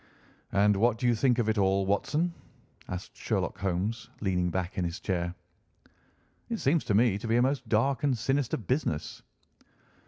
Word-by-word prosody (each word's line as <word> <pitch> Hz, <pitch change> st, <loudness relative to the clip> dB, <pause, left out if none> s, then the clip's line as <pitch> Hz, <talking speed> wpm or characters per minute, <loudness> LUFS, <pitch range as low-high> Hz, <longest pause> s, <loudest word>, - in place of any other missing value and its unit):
"And 100 Hz, +1 st, +4 dB
what 115 Hz, +2 st, +3 dB
do 125 Hz, -, -3 dB
you 120 Hz, -, +4 dB
think 125 Hz, +1 st, +2 dB
of 120 Hz, -3 st, +1 dB
it 110 Hz, -1 st, +1 dB
all, 95 Hz, 0 st, +2 dB
Watson?" 150 Hz, -, 0 dB, 0.6 s
asked 90 Hz, 0 st, -6 dB
Sherlock -, -, -2 dB
Holmes, 100 Hz, +5 st, -2 dB
leaning 90 Hz, -3 st, 0 dB
back 90 Hz, 0 st, -3 dB
in -, -, 0 dB
his 85 Hz, +2 st, -3 dB
chair. 90 Hz, -2 st, -2 dB, 1.1 s
"It 230 Hz, -, -1 dB
seems 155 Hz, -2 st, +2 dB
to 105 Hz, -, +1 dB
me 105 Hz, -2 st, +3 dB
to 115 Hz, -, -6 dB
be 115 Hz, -, +2 dB
a 120 Hz, -, +4 dB
most 130 Hz, -3 st, -1 dB
dark 120 Hz, +4 st, +2 dB
and 135 Hz, -4 st, +2 dB
sinister 135 Hz, +2 st, 0 dB
business." 110 Hz, -, -2 dB
110 Hz, 175 wpm, -29 LUFS, 95-125 Hz, 1.1 s, And